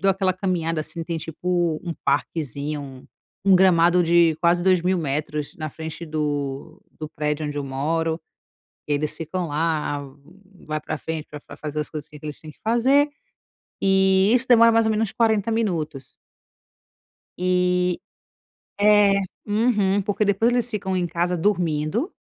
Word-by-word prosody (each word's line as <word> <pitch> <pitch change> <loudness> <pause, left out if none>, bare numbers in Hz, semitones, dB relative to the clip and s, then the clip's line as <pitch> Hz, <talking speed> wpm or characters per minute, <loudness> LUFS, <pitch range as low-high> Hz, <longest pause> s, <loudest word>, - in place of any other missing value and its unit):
dou 195 +2 +3
aquela 190 -1 +1
caminhada, 175 -4 -1
assim, 165 +2 -6
tem 170 -1 -3
tipo 170 0 -1
um 170 - -3
parquezinho, 140 -1 -3 0.4
um 195 -1 +6
gramado 180 -1 +5
de 170 -2 +4
quase 175 0 +3
2000 185 0 +2
metros, 150 -1 -3
na 155 -2 -5
frente 160 +2 -7
do 150 +1 -3 0.2
do 155 -1 -5
prédio 150 -1 -2
onde 145 0 -4
eu 140 - -3
moro, 160 +5 -1 0.7
eles 150 0 -1
ficam 170 +2 -4
lá, 150 -1 -1 0.7
vai 155 0 -2
pra 155 - -4
frente 160 -1 -5
pra 150 - -8
pra - - -12
fazer 150 0 -4
as 150 - -3
coisas 150 -2 -7
que 150 -1 -12
que - - -12
eles 150 -1 -6
têm 155 -1 -10
que - - -28
fazer, 260 +6 +3 0.7
e 190 +1 +4
isso 250 +1 +2
demora 230 -2 +7
mais 230 0 +4
ou - - +2
menos 215 -1 0
40 220 -2 +1
minutos. 170 -11 -2 1.3
E 180 0 +1 0.8
é, 205 -1 +5 0.3
uhum, 205 -2 +2
porque 205 +1 0
depois 205 +4 +2
eles 245 -1 0
ficam 195 -4 -2
em 180 -1 0
casa 175 +1 -1
dormindo, 175 - 0
170 Hz, 155 wpm, -23 LUFS, 155-195 Hz, 1.3 s, demora